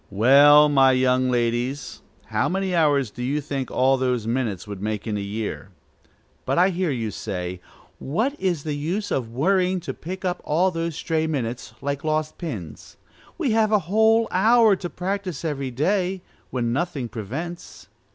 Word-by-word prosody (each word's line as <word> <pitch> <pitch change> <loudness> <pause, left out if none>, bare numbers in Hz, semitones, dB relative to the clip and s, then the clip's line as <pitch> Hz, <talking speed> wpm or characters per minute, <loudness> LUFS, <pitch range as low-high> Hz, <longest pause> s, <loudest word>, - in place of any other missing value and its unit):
Well, 140 +7 +7
my 135 -2 +5
young 130 0 +2
ladies, 120 +3 -1 0.2
how - - 0
many 190 0 -1
hours 145 -8 +2
do 125 - -9
you 135 +4 0
think 140 -3 -4
all 135 +1 +2
those 125 -3 -1
minutes 115 -6 -2
would 100 -2 -7
make 105 -1 -3
in 110 -2 -2
a - - -2
year? 100 0 -5 0.7
But - - -1
I 180 +2 +5
hear 180 -1 -1
you 115 -6 -2
say, 90 -3 -5 0.4
"What 220 - -1
is 175 -6 -1
the 155 - -3
use 175 +8 -3
of 125 -4 -1
worrying 185 +8 +1
to 165 - -5
pick 185 +3 -7
up 180 0 -2
all 175 +5 +2
those 165 -2 -3
stray 160 0 -1
minutes, 125 -6 -4
like 140 0 -2
lost 155 0 -1
pins? 110 - -7 0.4
We 305 -9 0
have 220 -1 +2
a 215 - +5 0.2
whole 220 +1 +4
hour 220 +2 +5
to 175 -1 -6
practise 185 -3 -4
every 140 -4 -2
day, 185 +7 0 0.3
when 120 -2 -1
nothing 140 -4 -2
prevents." 140 - -7
145 Hz, 170 wpm, -23 LUFS, 125-180 Hz, 0.7 s, Well